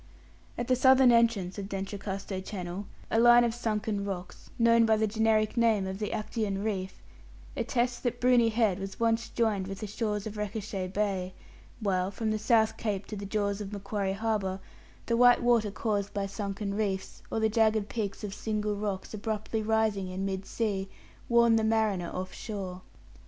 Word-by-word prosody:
At 240 - -2
the 255 - +4
southern 260 0 +6
entrance 225 -5 +2
of 195 0 -6
D'Entrecasteaux 195 0 -4
Channel, 190 0 -6 0.2
a 225 - +3
line 240 +1 +7
of 235 -1 +1
sunken 215 -3 -2
rocks, 190 -2 -6
known 230 0 +5
by 220 -1 +4
the 220 - +2
generic 220 0 +1
name 225 -4 +3
of 190 +1 -4
the 210 - -2
Actaeon 210 -2 -2
reef, 190 -3 -3 0.5
attests 240 -1 0
that 245 -1 -2
Bruny 245 -2 +4
Head 215 -4 +1
was 195 0 -6
once 230 0 +1
joined 210 -5 0
with 195 +1 -6
the - - -2
shores 210 0 -2
of 215 -1 -6
Recherche 205 -3 -4
Bay; 190 -3 -1 0.5
while, 185 -3 +1
from 215 +2 -2
the 215 - -1
South 220 0 +3
Cape 205 -3 -2
to 215 - -6
the 200 0 -6
jaws 200 0 -1
of 200 -1 -6
Macquarie 200 -1 -2
Harbour, 200 -3 -1 0.5
the 235 - +1
white 245 0 +6
water 235 -3 +3
caused 205 -1 -2
by 200 -1 0
sunken 200 0 -4
reefs, 200 -2 -2
or - - 0
the 220 - +3
jagged 220 -1 +2
peaks 215 -4 -4
of 205 -2 -4
single 210 0 -2
rocks 200 -1 -4
abruptly 215 +1 -2
rising 215 -3 +1
in 185 +1 -3
mid 195 0 -3
sea, 195 -4 -2 0.4
warn 235 -1 +5
the 220 - +1
mariner 220 -5 +1
off 185 0 -5
shore. 190 -4 -6
210 Hz, 180 wpm, -29 LUFS, 195-225 Hz, 0.5 s, line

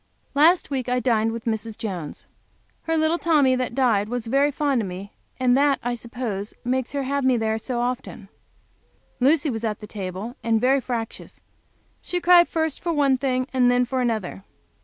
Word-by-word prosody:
Last 315 +3 +4
week 260 -3 -2
I 250 0 +1
dined 225 -3 +1
with 230 0 -6
Mrs. 220 -1 -2
Jones. 185 -10 -6 0.6
Her 325 0 0
little 315 +2 +1
Tommy 290 -6 +3
was 245 -2 0
very 275 +5 +2
fond 280 -3 0
of 205 - -3
me, 185 +2 -8 0.3
and 250 -1 +3
that, 280 -1 +3
I 245 +1 -1
suppose, 230 -4 -5
makes 255 +1 -1
her 280 -1 -1
have 280 +1 -1
me 260 -1 +3
there 220 0 -1
so 240 +2 -3
often. 245 -4 -4 0.9
Lucy 285 +3 +3
was 225 -1 -4
at 215 -2 -2
the 210 - -9
table, 200 +3 -6
and 225 -1 +2
very 265 +3 +3
fractious. 235 -3 -6 0.6
She 360 - -3
cried 350 0 +6
first 320 -3 -1
for 345 - -1
one 285 -4 +3
thing 255 -1 -1
and 250 -1 +4
then 245 0 +3
for 255 +1 -2
another. 220 -5 -2
250 Hz, 180 wpm, -23 LUFS, 225-275 Hz, 0.9 s, cried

